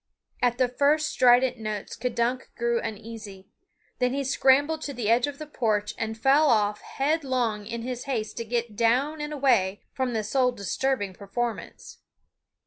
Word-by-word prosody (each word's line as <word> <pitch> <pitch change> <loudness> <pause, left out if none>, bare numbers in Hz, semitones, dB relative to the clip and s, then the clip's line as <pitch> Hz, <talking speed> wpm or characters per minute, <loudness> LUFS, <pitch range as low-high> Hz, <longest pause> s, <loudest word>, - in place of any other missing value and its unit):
At 245 -1 +2
the 255 -1 +3
first 295 +5 +2
strident 250 -3 +4
notes 215 -2 -5
K'dunk 245 +1 -1
grew 235 0 0
uneasy. 210 -3 -8 0.5
Then 250 0 +1
he 280 - -1
scrambled 280 +4 +3
to 285 -3 -5
the 225 -2 0
edge 240 +3 +3
of 285 -1 -6
the 305 - -7
porch 215 -8 -1
and 220 -1 -4
fell 275 +6 +4
off 210 -2 +2
headlong 260 -8 -1
in 230 0 -5
his 250 0 -5
haste 230 -6 -3
to 230 - -2
get 230 -1 -2
down 260 +8 +1
and 295 0 -4
away 235 -10 +1
from 260 -2 -1
the 220 -1 -1
soul 250 +3 +1
disturbing 205 0 -1
performance. 220 +4 -5
240 Hz, 160 wpm, -26 LUFS, 220-270 Hz, 0.5 s, strident